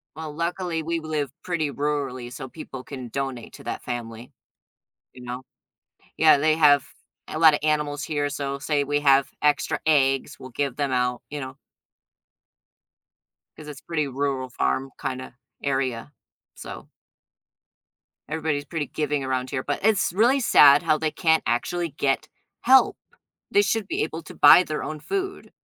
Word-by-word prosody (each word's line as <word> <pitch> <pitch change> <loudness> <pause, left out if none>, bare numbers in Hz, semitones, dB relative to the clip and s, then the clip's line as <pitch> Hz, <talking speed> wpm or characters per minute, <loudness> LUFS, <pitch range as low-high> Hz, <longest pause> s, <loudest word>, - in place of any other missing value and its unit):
Well, 155 -1 -6
luckily 170 0 -2
we 165 +1 -1
live 155 -4 -3
pretty 155 -5 -1
rurally, 140 -4 -3
so 130 0 -7
people 135 -2 -9
can 130 -3 -8
donate 130 -1 -5
to - - -12
that - - -5
family. 120 -1 -6 0.8
You 125 - -12
know, 125 +1 -6 0.7
yeah, 155 -2 +6
they 155 +2 +2
have 145 -4 +5 0.4
a 155 - -5
lotta 155 -3 +5
animals 150 -1 0
here, 145 -2 -1
so 140 -1 -4
say 145 0 0
we 145 +1 0
have 140 -2 +4
extra 150 -1 +1
eggs, 135 -3 +2
we'll 130 -1 -10
give 140 0 -2
them 140 -2 -1
out, 125 -1 0
you 150 - -4
know? 130 0 -7 2.0
'Cause 150 - -11
it's 145 -2 -9
pretty 155 -4 -2
rural 135 -1 -2
farm 130 +2 -1
kinda 130 -1 -5 0.3
area, 135 -2 -2 0.4
so. - - -9 1.4
Everybody 155 -1 -1
is 145 - -6
pretty 150 -1 -3
giving 150 -2 -2
around 130 -1 -2
here, 130 0 -3
but 145 - -2
it's 205 -5 +2
really 240 +8 +4
sad 145 - +6
how 155 -2 +2
they 155 0 -1
can't 160 -2 +2
actually 165 +9 -1
get 140 +1 -1 0.3
help. 265 +2 +5 0.5
They 405 - +5
should 225 - -1
be - - -1
able 160 +1 -5
to - - -11
buy 145 +5 +8
their 155 -3 -4
own 155 0 -5
food. 390 - -4
145 Hz, 155 wpm, -24 LUFS, 135-155 Hz, 2.0 s, buy